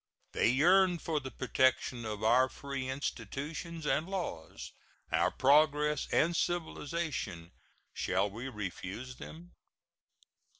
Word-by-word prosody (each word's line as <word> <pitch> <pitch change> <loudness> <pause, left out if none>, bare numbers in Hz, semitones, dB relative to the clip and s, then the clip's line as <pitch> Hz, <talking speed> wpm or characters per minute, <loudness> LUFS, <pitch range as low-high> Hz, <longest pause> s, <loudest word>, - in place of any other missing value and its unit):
They - - +3
yearn 180 +7 +5
for 160 -2 -1
the 135 -2 -7
protection 130 -2 +1
of 105 -1 -4
our 125 +4 +5
free 135 -2 -5
institutions 150 +4 -4
and 155 +3 +1
laws, 175 - -5 0.4
our - - +3
progress 150 +1 +3
and 170 +2 +3
civilization. 160 - -2 0.4
Shall 95 +2 +1
we 120 +6 -6
refuse 105 +3 -6
them? 175 +3 -10
140 Hz, 110 wpm, -32 LUFS, 120-165 Hz, 0.4 s, yearn